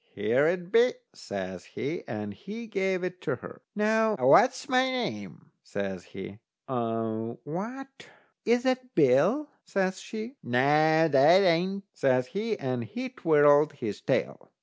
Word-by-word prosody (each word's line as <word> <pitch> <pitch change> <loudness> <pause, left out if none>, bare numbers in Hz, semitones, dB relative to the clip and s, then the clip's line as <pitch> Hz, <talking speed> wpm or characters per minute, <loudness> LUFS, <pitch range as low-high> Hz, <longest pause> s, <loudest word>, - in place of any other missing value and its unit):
"Here 150 - +2
it 175 +1 -2
be," 235 - +4 0.2
says 95 -2 -6
he, - - -5
and 105 -1 -5
he 210 - -9
gave 190 -3 -1
it 180 0 -5
to - - -2
her. 245 - -12
"Now, 220 +1 +2
what's 260 +2 +4
my 255 -1 +2
name?" 165 - -5
says 95 -3 -5
he. 100 +2 -10 0.3
"What, 125 - -4 0.4
is 240 +2 +2
that 255 -1 -1
Bill?" 165 - +3 0.2
says 190 -1 -1
she. 225 +7 -7
"Noo, 150 +6 +3
that 150 +6 +5
ain't," 185 +3 +1
says 130 -1 +1
he, 210 - -3
and 125 -3 -3
he 250 - -6
twirled 150 - +4
his 115 -8 -6
tail. - - -2
175 Hz, 135 wpm, -27 LUFS, -, 0.4 s, that